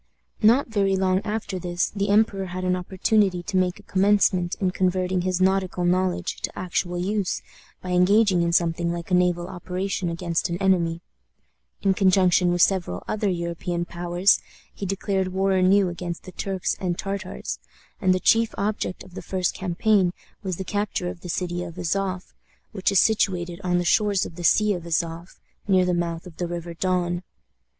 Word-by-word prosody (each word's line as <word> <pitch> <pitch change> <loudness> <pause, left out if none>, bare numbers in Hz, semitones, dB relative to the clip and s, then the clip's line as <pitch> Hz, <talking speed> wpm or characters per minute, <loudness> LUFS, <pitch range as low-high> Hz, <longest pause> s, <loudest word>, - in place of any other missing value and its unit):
Not 235 +6 +5
very 200 -3 +1
long 190 0 +2
after 210 -3 -3
this 175 0 -1
the 200 0 -2
emperor 200 -2 +2
had 185 +1 -5
an 180 0 +1
opportunity 185 0 +1
to 190 - -5
make 185 -1 +1
a - - -15
commencement 190 -2 +2
in 185 -2 +1
converting 185 0 0
his 185 0 -1
nautical 185 -1 +1
knowledge 185 +1 0
to - - -4
actual 180 0 -2
use 195 +1 -1 0.4
by 180 - -4
engaging 185 +1 +4
in 170 0 +1
something 170 0 +1
like 170 +1 -6
a - - +1
naval 180 -1 +2
operation 180 0 -3
against 170 +1 -2
an 170 - -2
enemy, 175 -3 +1 0.8
in 195 -1 +4
conjunction 185 -2 +3
with 175 -1 +4
several 175 - 0
other 210 -1 0
European 170 0 -2
powers, 175 +2 +2 0.3
he 200 - -5
declared 195 0 -1
war 190 +1 0
anew 190 +1 +4
against 175 -1 -5
the 185 - -10
Turks 190 0 -2
and 175 -2 -2
Tartars, 195 -1 -4 0.4
and 185 -2 +3
the 185 - +2
chief 225 +3 +3
object 200 -2 -2
of 185 -1 -16
the - - -6
first 185 -2 -1
campaign 185 0 +1 0.3
was 190 -3 -3
the 190 - -4
capture 205 -3 -2
of 175 - -9
the 180 - -8
city 175 0 -2
of 170 -2 -8
Azof, 185 +1 -2 0.4
which 195 -3 0
is 195 - +5
situated 185 -5 +1
on 180 -1 +1
the 175 - 0
shores 205 +1 +2
of - - -8
the 175 +1 -8
Sea 210 +4 +4
of 175 - -4
Azof, 170 +1 -3 0.3
near 185 -2 +4
the 180 - +1
mouth 170 -1 -2
of 175 -3 -12
the 175 - -2
River 170 0 -5
Don. 175 0 -1
185 Hz, 180 wpm, -24 LUFS, 175-195 Hz, 0.8 s, Not